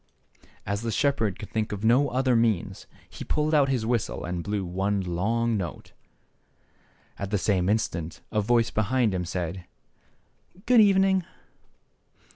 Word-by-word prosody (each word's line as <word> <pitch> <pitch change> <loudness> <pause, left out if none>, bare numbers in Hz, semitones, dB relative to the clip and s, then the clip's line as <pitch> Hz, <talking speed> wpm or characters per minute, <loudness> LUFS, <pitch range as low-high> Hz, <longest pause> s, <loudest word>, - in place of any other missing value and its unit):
As 100 +1 -2
the 115 -1 -2
shepherd 115 -5 0
could 105 - -9
think 110 -1 -2
of 105 +1 -4
no 130 +5 +4
other 130 -1 +1
means, 115 -5 0 0.2
he - - -9
pulled 155 +1 0
out 145 -3 +4
his 125 -4 0
whistle 115 -1 -1
and 85 0 -4
blew 100 0 -2
one 95 +3 -1
long 110 +7 0
note. 85 -5 -6 1.3
And 100 - -2
at - - -8
the 105 - +1
same 95 -1 +1
instant 85 -7 -2
a 105 - +1
voice 115 +2 +2
behind 115 0 +1
him 90 -1 -2
said 90 0 -4 0.5
" 190 +5 -28
Good 245 -3 +6
evening 195 -2 +4
110 Hz, 155 wpm, -26 LUFS, 95-125 Hz, 1.3 s, Good